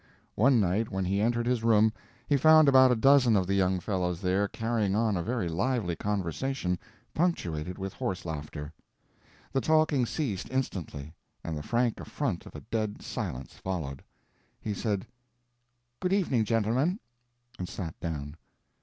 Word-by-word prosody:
One 125 Hz, +3 st, +4 dB
night 105 Hz, +3 st, +1 dB
when 95 Hz, -1 st, -2 dB
he 100 Hz, +2 st, +1 dB
entered 120 Hz, +1 st, +1 dB
his 120 Hz, -2 st, 0 dB
room 110 Hz, -1 st, +4 dB, 0.3 s
he 145 Hz, -, +3 dB
found 155 Hz, +2 st, +7 dB
about 130 Hz, -2 st, +7 dB
a -, -, +4 dB
dozen 130 Hz, -1 st, +5 dB
of 95 Hz, -2 st, +2 dB
the 95 Hz, -, -1 dB
young 95 Hz, -1 st, +2 dB
fellows 90 Hz, -2 st, -1 dB
there 95 Hz, +2 st, +1 dB
carrying 110 Hz, -2 st, -1 dB
on 110 Hz, -1 st, +2 dB
a 85 Hz, -, 0 dB
very 115 Hz, +1 st, -1 dB
lively 95 Hz, +1 st, 0 dB
conversation 100 Hz, -, -2 dB, 0.3 s
punctuated 90 Hz, -, -1 dB
with 95 Hz, 0 st, -5 dB
horse 95 Hz, -2 st, -3 dB
laughter. 75 Hz, -1 st, -6 dB, 0.8 s
The 135 Hz, -, +2 dB
talking 155 Hz, -5 st, +3 dB
ceased 110 Hz, -, -3 dB
instantly, 85 Hz, -, -3 dB, 0.3 s
and 80 Hz, -, -3 dB
the 75 Hz, -, -4 dB
frank 120 Hz, +6 st, 0 dB
affront -, -, -3 dB
of -, -, -13 dB
a -, -, -7 dB
dead 110 Hz, -2 st, -3 dB
silence 65 Hz, +2 st, -5 dB
followed. 75 Hz, -8 st, -5 dB, 0.6 s
He 105 Hz, -, -3 dB
said, 100 Hz, -1 st, -2 dB, 0.9 s
"Good 180 Hz, +1 st, 0 dB
evening 135 Hz, -, +2 dB
gentlemen," 115 Hz, -, +1 dB, 0.6 s
and 90 Hz, -, -4 dB
sat 85 Hz, -5 st, -5 dB
down. 80 Hz, -3 st, -5 dB
105 Hz, 155 wpm, -29 LUFS, 90-125 Hz, 0.9 s, found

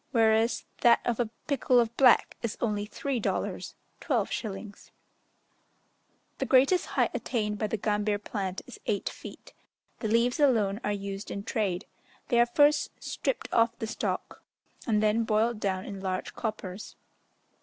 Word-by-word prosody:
whereas 225 Hz, 0 st, +3 dB, 0.2 s
that 235 Hz, -1 st, +6 dB
of 240 Hz, -1 st, 0 dB
a 235 Hz, -3 st, 0 dB, 0.2 s
pikul 265 Hz, -4 st, +3 dB
of 235 Hz, -1 st, 0 dB
black 255 Hz, -3 st, +5 dB
is 230 Hz, -2 st, -3 dB
only 210 Hz, -3 st, -1 dB
three 270 Hz, +3 st, -2 dB
dollars -, -, -3 dB, 0.3 s
(12s.). 205 Hz, -1 st, -3 dB, 1.5 s
The -, -, 0 dB
greatest 275 Hz, +8 st, +4 dB
height -, -, +1 dB
attained 210 Hz, -4 st, -2 dB
by 215 Hz, -, 0 dB
the 220 Hz, -, -2 dB
gambir 210 Hz, 0 st, 0 dB
plant 195 Hz, -2 st, -4 dB
is -, -, -11 dB
eight 205 Hz, -, 0 dB
feet. -, -, -11 dB, 0.5 s
The 220 Hz, -, -2 dB
leaves 235 Hz, +5 st, +2 dB
alone 220 Hz, -7 st, +3 dB
are 210 Hz, -, 0 dB
used 200 Hz, 0 st, -5 dB
in 200 Hz, -, -5 dB
trade: 200 Hz, -4 st, -1 dB, 0.4 s
they 240 Hz, -3 st, +3 dB
are 240 Hz, -, +5 dB
first 290 Hz, +4 st, +4 dB
stripped -, -, -3 dB
off 230 Hz, 0 st, +3 dB
the -, -, -3 dB
stalk, 220 Hz, -, -4 dB, 0.5 s
and 215 Hz, -2 st, +2 dB
then 215 Hz, +2 st, +3 dB
boiled 220 Hz, +1 st, +1 dB
down 190 Hz, -2 st, -1 dB
in 195 Hz, -2 st, -7 dB
large 185 Hz, -1 st, -3 dB
coppers. 210 Hz, -3 st, -5 dB
220 Hz, 150 wpm, -28 LUFS, 205-240 Hz, 1.5 s, that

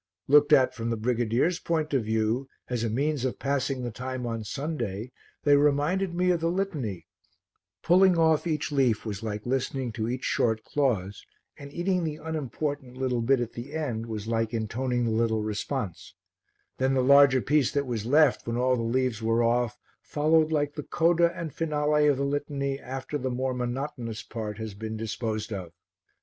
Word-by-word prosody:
Looked 145 Hz, +1 st, +5 dB
at 130 Hz, -, +5 dB
from 115 Hz, -1 st, -4 dB
the 115 Hz, -, -1 dB
brigadier's 120 Hz, +8 st, +1 dB
point 155 Hz, -3 st, -1 dB
of 130 Hz, -4 st, +2 dB
view, 110 Hz, +4 st, 0 dB, 0.2 s
as 120 Hz, -2 st, -2 dB
a 115 Hz, -, 0 dB
means 140 Hz, +4 st, 0 dB
of 130 Hz, -, -1 dB
passing 135 Hz, -1 st, -1 dB
the 120 Hz, -, -3 dB
time 130 Hz, +2 st, -5 dB
on 115 Hz, -1 st, -3 dB
Sunday, 120 Hz, -4 st, -4 dB, 0.3 s
they 145 Hz, -1 st, +5 dB
reminded 150 Hz, +6 st, +2 dB
me 180 Hz, +1 st, +2 dB
of 175 Hz, -, +1 dB
the 165 Hz, 0 st, 0 dB
Litany; 155 Hz, -, -3 dB, 0.8 s
pulling 185 Hz, +1 st, +5 dB
off 160 Hz, 0 st, +3 dB
each 155 Hz, -2 st, -1 dB
leaf 130 Hz, -7 st, +2 dB
was 100 Hz, -3 st, -4 dB
like 105 Hz, -2 st, -4 dB
listening 130 Hz, 0 st, -1 dB
to 110 Hz, +1 st, -3 dB
each 125 Hz, +1 st, -3 dB
short 110 Hz, -2 st, +1 dB
clause 105 Hz, -9 st, -1 dB, 0.3 s
and 140 Hz, 0 st, -10 dB
eating 180 Hz, +3 st, 0 dB
the 155 Hz, -2 st, -2 dB
unimportant 145 Hz, -3 st, -4 dB
little 130 Hz, -2 st, 0 dB
bit 130 Hz, +3 st, +3 dB
at 120 Hz, -1 st, -3 dB
the 125 Hz, +5 st, -8 dB
end 120 Hz, -8 st, -3 dB
was 110 Hz, -2 st, -5 dB
like 115 Hz, 0 st, -1 dB
intoning 120 Hz, +3 st, -1 dB
the 115 Hz, -, 0 dB
little 110 Hz, -1 st, +1 dB
response; 105 Hz, -, -4 dB, 0.6 s
then 130 Hz, +1 st, +2 dB
the 130 Hz, -, +2 dB
larger 140 Hz, 0 st, +6 dB
piece 145 Hz, 0 st, +2 dB
that 140 Hz, 0 st, 0 dB
was 120 Hz, -5 st, -3 dB
left, 145 Hz, -1 st, +4 dB
when 115 Hz, 0 st, -1 dB
all 130 Hz, +1 st, +2 dB
the 120 Hz, -, -2 dB
leaves 120 Hz, -1 st, 0 dB
were 115 Hz, +1 st, +2 dB
off, 120 Hz, -1 st, +1 dB, 0.2 s
followed 155 Hz, +1 st, +2 dB
like 145 Hz, -2 st, 0 dB
the 150 Hz, -, -5 dB
coda 170 Hz, +2 st, +2 dB
and 165 Hz, -3 st, -5 dB
finale 150 Hz, -1 st, +1 dB
of 145 Hz, -2 st, +3 dB
the 140 Hz, -, 0 dB
Litany 140 Hz, -1 st, -2 dB
after 135 Hz, +3 st, -5 dB
the 130 Hz, 0 st, -2 dB
more 130 Hz, +1 st, -1 dB
monotonous 125 Hz, -2 st, -4 dB
part 105 Hz, -2 st, -5 dB
has 110 Hz, -2 st, -5 dB
been 110 Hz, +2 st, -5 dB
disposed 110 Hz, 0 st, -3 dB
of. 90 Hz, -4 st, -6 dB
130 Hz, 185 wpm, -27 LUFS, 115-150 Hz, 0.8 s, larger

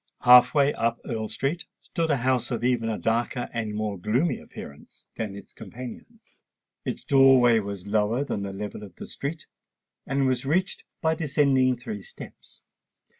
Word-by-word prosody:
Half 125 Hz, +4 st, +7 dB
way 145 Hz, 0 st, +4 dB
up 115 Hz, 0 st, -1 dB
Earl 110 Hz, -2 st, -3 dB
Street 135 Hz, +10 st, -3 dB
stood 165 Hz, -3 st, -3 dB
a 145 Hz, -, +3 dB
house 130 Hz, -1 st, 0 dB
of 120 Hz, -2 st, -3 dB
even 120 Hz, -2 st, +1 dB
a 110 Hz, -, -2 dB
darker 120 Hz, +2 st, -1 dB
and 110 Hz, -3 st, -3 dB
more 105 Hz, -2 st, -3 dB
gloomy 125 Hz, -, 0 dB
appearance 70 Hz, -, -12 dB
than 105 Hz, -3 st, -4 dB
its 100 Hz, -, -12 dB
companions. 130 Hz, -, -10 dB, 0.6 s
Its -, -, -4 dB
door 135 Hz, -2 st, +6 dB
way 120 Hz, -2 st, +5 dB
was 100 Hz, -3 st, -6 dB
lower 110 Hz, +5 st, +1 dB
than 105 Hz, -, -3 dB
the 100 Hz, 0 st, -4 dB
level 105 Hz, +2 st, -6 dB
of 100 Hz, -4 st, -11 dB
the -, -, -8 dB
street, 155 Hz, +3 st, -6 dB, 0.6 s
and 135 Hz, 0 st, +1 dB
was 130 Hz, -1 st, 0 dB
reached 180 Hz, +8 st, -1 dB, 0.2 s
by 160 Hz, 0 st, +3 dB
descending 140 Hz, -5 st, +2 dB
three 210 Hz, -, -6 dB
steps. 485 Hz, -, -13 dB
125 Hz, 170 wpm, -26 LUFS, 110-140 Hz, 0.6 s, Half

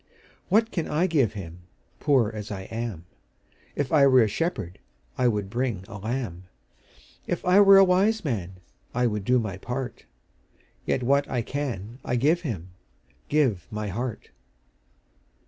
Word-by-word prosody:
What 225 Hz, +4 st, +3 dB
can 170 Hz, -, -2 dB
I 155 Hz, +4 st, +1 dB
give 140 Hz, -, +2 dB
Him, 90 Hz, -4 st, -8 dB, 0.4 s
Poor 130 Hz, -7 st, +3 dB
as 105 Hz, -1 st, -6 dB
I 100 Hz, -2 st, -5 dB
am? 110 Hz, -7 st, -4 dB, 0.7 s
If 140 Hz, -3 st, -2 dB
I 140 Hz, -3 st, +6 dB
were 130 Hz, -3 st, +6 dB
a -, -, +2 dB
shepherd, 105 Hz, -, -3 dB, 0.4 s
I 125 Hz, -, +2 dB
would 105 Hz, -4 st, 0 dB
bring 115 Hz, -3 st, -2 dB
a 105 Hz, -, -8 dB
lamb; 110 Hz, -5 st, -4 dB, 0.8 s
If -, -, -3 dB
I 180 Hz, +2 st, +5 dB
were 195 Hz, -1 st, +8 dB
a 195 Hz, -, +9 dB
wise 195 Hz, +3 st, +2 dB
man, 95 Hz, -, -2 dB, 0.4 s
I 125 Hz, 0 st, +2 dB
would 105 Hz, -3 st, -1 dB
do 125 Hz, +5 st, +3 dB
my 105 Hz, -5 st, -2 dB
part: 125 Hz, +5 st, -5 dB, 0.8 s
Yet 130 Hz, -, 0 dB
what 140 Hz, +3 st, +2 dB
I 125 Hz, -3 st, -1 dB
can 120 Hz, -4 st, -4 dB
I 125 Hz, -, -1 dB
give 155 Hz, +8 st, +2 dB
Him, 100 Hz, -, -5 dB, 0.6 s
Give 130 Hz, -, +1 dB
my 105 Hz, -2 st, -4 dB
heart. 115 Hz, +4 st, -5 dB
125 Hz, 155 wpm, -26 LUFS, 105-145 Hz, 0.8 s, a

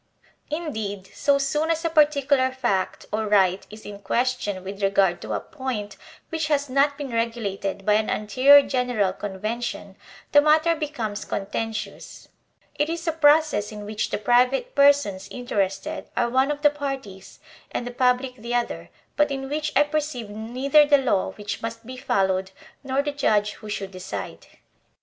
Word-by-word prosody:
Indeed, 220 Hz, -, -4 dB
so 280 Hz, -1 st, +2 dB
soon 295 Hz, +3 st, 0 dB
as 330 Hz, 0 st, 0 dB
a -, -, +2 dB
particular 285 Hz, -4 st, +3 dB
fact 240 Hz, -8 st, -1 dB
or 215 Hz, 0 st, -1 dB
right 195 Hz, -2 st, +2 dB
is 215 Hz, +1 st, -12 dB
in 205 Hz, -1 st, -8 dB
question 220 Hz, -4 st, -1 dB
with 195 Hz, +1 st, -7 dB
regard 195 Hz, -2 st, +2 dB
to -, -, -5 dB
a -, -, 0 dB
point 260 Hz, -9 st, -5 dB, 0.3 s
which 320 Hz, -1 st, -2 dB
has 285 Hz, -3 st, 0 dB
not 280 Hz, +1 st, +2 dB
been 285 Hz, -3 st, -5 dB
regulated 215 Hz, -4 st, -2 dB
by 210 Hz, -, +4 dB
an 215 Hz, +1 st, +1 dB
anterior 260 Hz, +7 st, +5 dB
general 245 Hz, -7 st, 0 dB
convention, 205 Hz, +1 st, -5 dB, 0.4 s
the 290 Hz, -, +7 dB
matter 310 Hz, +3 st, +4 dB
becomes 245 Hz, -10 st, -4 dB
contentious; 220 Hz, +3 st, -5 dB, 0.5 s
it 295 Hz, +2 st, +1 dB
is 335 Hz, +1 st, -4 dB
a -, -, +3 dB
process 300 Hz, -8 st, +3 dB
in 210 Hz, -1 st, -8 dB
which 210 Hz, 0 st, -3 dB
the -, -, -1 dB
private 250 Hz, -, +2 dB
persons 280 Hz, -10 st, +3 dB
interested 195 Hz, -6 st, -3 dB
are 235 Hz, -1 st, +1 dB
one 260 Hz, +2 st, +3 dB
of 295 Hz, 0 st, -3 dB
the 295 Hz, -, +6 dB
parties 270 Hz, -10 st, -6 dB, 0.3 s
and 240 Hz, -, -3 dB
the 245 Hz, -, -5 dB
public 250 Hz, +1 st, +1 dB
the 235 Hz, +2 st, -4 dB
other, 85 Hz, -, -2 dB, 0.3 s
but 295 Hz, +2 st, +3 dB
in 270 Hz, -1 st, -4 dB
which 300 Hz, +1 st, -2 dB
I -, -, +6 dB
perceive 290 Hz, -7 st, -3 dB
neither 255 Hz, +8 st, +3 dB
the 290 Hz, 0 st, +5 dB
law 245 Hz, -8 st, 0 dB
which 205 Hz, 0 st, -6 dB
must 230 Hz, 0 st, -6 dB
be 255 Hz, +2 st, -8 dB
followed, 190 Hz, -5 st, 0 dB, 0.3 s
nor 270 Hz, +1 st, 0 dB
the 290 Hz, -, -2 dB
judge 210 Hz, -7 st, +1 dB
who 215 Hz, -, -11 dB
should 195 Hz, -2 st, -4 dB
decide. 185 Hz, 0 st, -7 dB
245 Hz, 165 wpm, -24 LUFS, 205-285 Hz, 0.5 s, the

